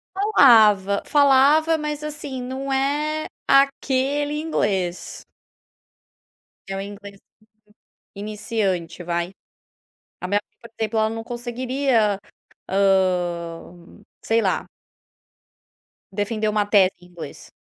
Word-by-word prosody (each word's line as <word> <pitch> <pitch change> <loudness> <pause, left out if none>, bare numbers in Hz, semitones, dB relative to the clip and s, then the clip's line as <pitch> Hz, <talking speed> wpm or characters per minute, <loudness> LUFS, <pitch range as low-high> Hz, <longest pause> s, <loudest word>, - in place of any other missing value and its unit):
Falava, 220 - +5
falava, 290 +3 +4
mas 300 -1 -4
assim 290 -4 -6
não 265 +2 -5
é 295 +3 0 0.2
aquele 275 +2 +2
inglês. 195 - -2 1.5
É 195 - -3
um - - -3
inglês 200 0 -10 1.0
iniciante 200 -4 -3
vai, 170 +2 -2 0.9
a 180 - -3
minha 205 +2 +2
mãe - - -50
por 235 - -12
exemplo 220 0 0
ela 220 0 +2
não 225 0 -5
conseguiria, 240 -3 -1 0.5
hã, 180 -2 -1 0.2
sei 225 0 +2
lá 190 -3 0 1.5
Defender 215 +2 -1
uma 210 -1 +1
tese 195 -2 +4
em 180 - -16
inglês. 175 -2 -10
220 Hz, 100 wpm, -22 LUFS, 195-275 Hz, 1.5 s, Falava